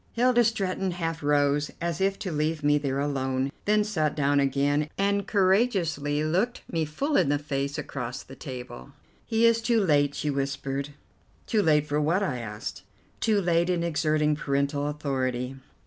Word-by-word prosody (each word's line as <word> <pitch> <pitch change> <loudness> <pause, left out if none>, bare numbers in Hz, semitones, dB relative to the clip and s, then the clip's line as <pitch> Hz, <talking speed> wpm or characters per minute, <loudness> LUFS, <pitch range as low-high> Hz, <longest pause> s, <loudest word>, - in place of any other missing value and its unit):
Hilda 240 0 +4
Stretton 195 -4 0
half 165 -2 -3
rose, 145 0 +2
as 170 0 -2
if 195 0 +1
to 185 - -4
leave 155 0 -1
me 145 0 +4
there 135 -2 -2
alone, 135 -1 -1
then 210 0 +3
sat 160 -8 -1
down 145 -1 +2
again, 140 +2 +1
and 200 0 +1
courageously 185 -8 +2
looked 185 +10 0
me 165 -2 -1
full 275 - -2
in 140 - +3
the 145 - +2
face 140 -1 -3
across 125 -2 -5
the 135 - -12
table. 125 -1 -8 0.3
"He 225 0 +3
is 230 0 +4
too 230 0 +2
late," 145 -7 +2
she 150 - -1
whispered. 140 0 -2 0.6
"Too 220 -3 +2
late 150 -5 +3
for 150 0 0
what?" 170 +7 +1
I 135 -10 -2
asked. 105 -2 -6 0.4
"Too 215 -2 +2
late 170 -1 +2
in 175 -2 +1
exerting 155 -2 +1
parental 140 -1 -1
authority." 135 -3 -2
150 Hz, 165 wpm, -27 LUFS, 140-190 Hz, 0.6 s, Hilda